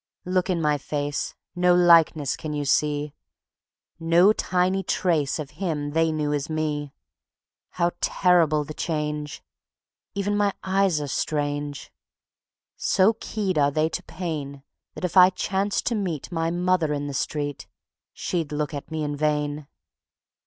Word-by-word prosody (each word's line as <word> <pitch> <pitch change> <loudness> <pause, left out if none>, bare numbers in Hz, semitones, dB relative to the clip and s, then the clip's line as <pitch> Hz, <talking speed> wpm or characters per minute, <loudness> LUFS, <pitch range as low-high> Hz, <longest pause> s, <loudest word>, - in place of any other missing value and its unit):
Look 180 0 0
in 180 -2 +1
my 150 -2 +1
face 145 0 -3 0.2
no 180 0 +4
likeness 165 -5 +5
can 155 -1 -5
you 145 -1 -2
see, 145 +1 +1 0.9
No 170 +5 +5
tiny 185 -1 0
trace 165 -6 0
of 150 -3 -6
him 150 -6 -2
they 165 +1 +2
knew 150 -1 -1
as 145 +1 -2
"me". 150 -2 -2 0.8
How 175 -1 0
terrible 165 -4 +3
the 155 - -8
change! 150 -2 -3 0.7
Even 200 +1 0
my 205 -1 +2
eyes 190 -3 +2
are 145 - -4
strange. 145 -1 -2 0.9
So 195 +4 +3
keyed 195 -7 -1
are 140 -1 +4
they 155 +2 +1
to - - -4
pain, 145 -6 -5 0.3
That - - -3
if 180 - -4
I 180 -1 +9
chanced 195 +2 -1
to 240 - +1
meet 185 - -3
My 165 -1 0
mother 175 -2 +1
in 145 0 -3
the 145 - -4
street 145 +1 -3 0.4
She'd 165 -5 -3
look 150 -1 -2
at 145 - -6
me 160 -1 -3
in 145 0 -2
vain. 150 -1 -1
155 Hz, 145 wpm, -25 LUFS, 145-180 Hz, 0.9 s, I